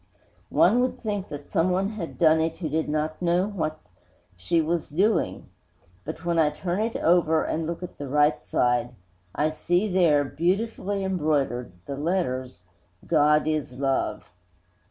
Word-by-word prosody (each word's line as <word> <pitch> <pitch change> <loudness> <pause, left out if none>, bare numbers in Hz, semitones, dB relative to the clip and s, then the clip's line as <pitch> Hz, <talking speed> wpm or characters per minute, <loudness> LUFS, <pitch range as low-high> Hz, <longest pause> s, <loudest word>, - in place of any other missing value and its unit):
One 240 - +4
would 255 - -1
think 205 -4 -3
that 145 -1 -9
someone 185 +3 +1
had 210 -7 -6
done 160 -1 +5
it 160 0 -1
who 160 -4 -4
did 155 +1 -1
not 155 +2 -2
know 175 +1 +2
what 160 -7 -3 0.6
she 95 - 0
was 165 +1 -1
doing. 195 +9 0 0.6
But, - - -7
when 170 -1 +1
I 155 -2 +4
turn 175 +5 -3
it 225 +1 -2
over 165 -2 +3
and 160 0 -2
look 170 +2 -4
at 180 - -9
the 145 - -5
right 150 +2 +2
side, 120 0 0 0.4
I 155 +1 +1
see 175 +6 0
there, 170 -7 +3
beautifully 195 +6 -1
embroidered, 150 - 0
the 140 - -5
letters 130 - -2 0.4
GOD 150 -1 +3
IS 150 -5 -2
LOVE. 135 0 -1
160 Hz, 155 wpm, -25 LUFS, 150-180 Hz, 0.6 s, done